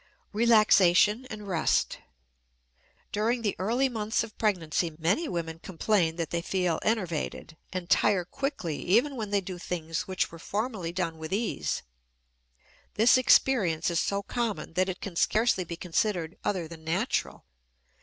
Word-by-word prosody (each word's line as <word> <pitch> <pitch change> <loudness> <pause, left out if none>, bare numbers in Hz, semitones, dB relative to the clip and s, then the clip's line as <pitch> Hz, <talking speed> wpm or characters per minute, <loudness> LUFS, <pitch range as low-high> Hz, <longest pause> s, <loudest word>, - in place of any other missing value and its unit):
RELAXATION 215 0 +4
AND 210 -1 -7
REST. 170 -5 +1 1.1
During 230 +3 0
the 205 - 0
early 235 +8 +1
months 220 -3 -1
of 225 -2 -10
pregnancy 170 -5 0
many 180 - +1
women 165 -2 -4
complain 175 -1 0
that 165 -1 -3
they 170 - -1
feel 180 -2 0
enervated, 175 -7 -2 0.2
and 185 -2 -4
tire 190 -2 +3
quickly 275 - -3
even 240 +10 +2
when 220 -4 -4
they 200 -1 +1
do 180 -1 -7
things 165 -2 -4
which 185 -1 -1
were 165 - -11
formerly 205 -2 -3
done 170 -2 -3
with 160 +1 -7
ease; 215 +4 -1 1.1
this 225 +3 +6
experience 195 -10 +3
is 170 - +1
so 200 0 -1
common 230 -6 -3
that 185 +2 +1
it 185 - -5
can 195 -4 -6
scarcely 215 +1 +2
be 170 0 -6
considered 175 0 -1
other 180 -5 -1
than 160 -1 -11
natural. 180 +10 -1
190 Hz, 145 wpm, -28 LUFS, 170-220 Hz, 1.1 s, this